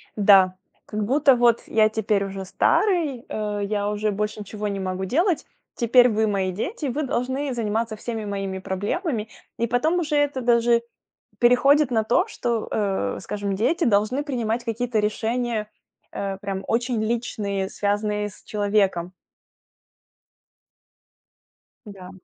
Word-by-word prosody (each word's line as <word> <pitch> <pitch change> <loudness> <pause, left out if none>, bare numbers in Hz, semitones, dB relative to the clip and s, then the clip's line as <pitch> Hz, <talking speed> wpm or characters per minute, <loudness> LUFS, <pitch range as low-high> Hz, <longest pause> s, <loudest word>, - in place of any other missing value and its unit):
Да. 195 -3 +5 0.3
Как 215 0 -3
будто: 275 +3 +4
"Вот 240 -1 +3
я 215 -1 +4
теперь 215 -2 0
уже 195 0 -6
старый, 290 - +1
э, 210 -1 -3
я 205 0 -1
уже 210 0 -1
больше 210 +1 -3
ничего 210 +1 -5
не 200 -1 -3
могу 190 0 -3
делать. 335 - +1 0.3
Теперь 245 +1 +5
вы- 220 0 +1
мои 195 -2 0
дети, 295 - -4
вы 285 +4 -2
должны 260 +2 -2
заниматься 225 -1 -1
всеми 220 0 -5
моими 195 -2 -3
проблемами". 215 - -2 0.3
И 235 - 0
потом 310 +10 +1
уже 305 -3 -1
это 290 -2 +1
даже 235 -1 +3 0.6
переходит 275 +3 +4
на 220 -2 +2
то, 295 - +2
что, 235 - -2
э, 195 - -1
скажем, 200 -1 -3
дети 310 - +1
должны 220 +6 +2
принимать 240 -5 -2
какие-то 230 0 -1
решения, 220 +1 -1 0.4
э, 195 -1 -4
прям 195 -1 -4
очень 240 -1 0
личные, 210 -4 -2
связанные 210 +1 -1
с 195 - -18
человеком. 200 -4 0 2.7
Да. 195 -3 -10
220 Hz, 135 wpm, -23 LUFS, 205-245 Hz, 2.7 s, Да